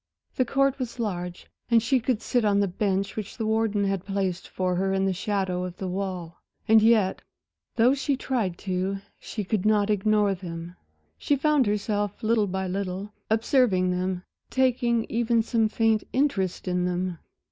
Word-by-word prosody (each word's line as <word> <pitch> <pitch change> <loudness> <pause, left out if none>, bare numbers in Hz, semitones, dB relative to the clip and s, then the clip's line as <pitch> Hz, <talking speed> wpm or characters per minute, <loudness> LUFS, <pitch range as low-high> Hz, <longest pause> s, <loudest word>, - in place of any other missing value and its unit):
The 255 - +2
court 275 +2 +1
was 250 -2 -4
large, 180 -5 -3 0.2
and 230 -2 +4
she 255 +3 +3
could 235 -2 -1
sit 245 -2 +1
on 205 -1 +3
the 200 - +2
bench 195 +1 -1
which 210 -2 -6
the 225 - -2
warden 220 -2 +1
had 195 -2 -1
placed 195 -3 -2
for 185 -1 -1
her 190 +2 0
in 195 0 +1
the 190 - +1
shadow 190 -2 -1
of 180 -1 -6
the 190 - -4
wall. 180 -3 -4 0.3
And 220 0 +7
yet, 220 -4 +3 0.5
though 240 +3 +5
she 280 0 0
tried 225 -11 -1
to, 190 +1 -1 0.2
she 210 - -5
could 200 0 -1
not 210 -1 +3
ignore 210 0 +2
them; 175 -1 -7 0.4
she 290 - +2
found 290 -3 +2
herself, 205 0 -1
little 220 -1 +2
by 190 0 -2
little, 195 +2 -4 0.2
observing 220 -5 +3
them, 180 0 -2 0.3
taking 245 -3 +2
even 230 0 +1
some 225 -1 +1
faint 225 -1 +2
interest 230 -11 0
in 180 0 0
them. 180 -1 -2
205 Hz, 170 wpm, -26 LUFS, 185-230 Hz, 0.5 s, And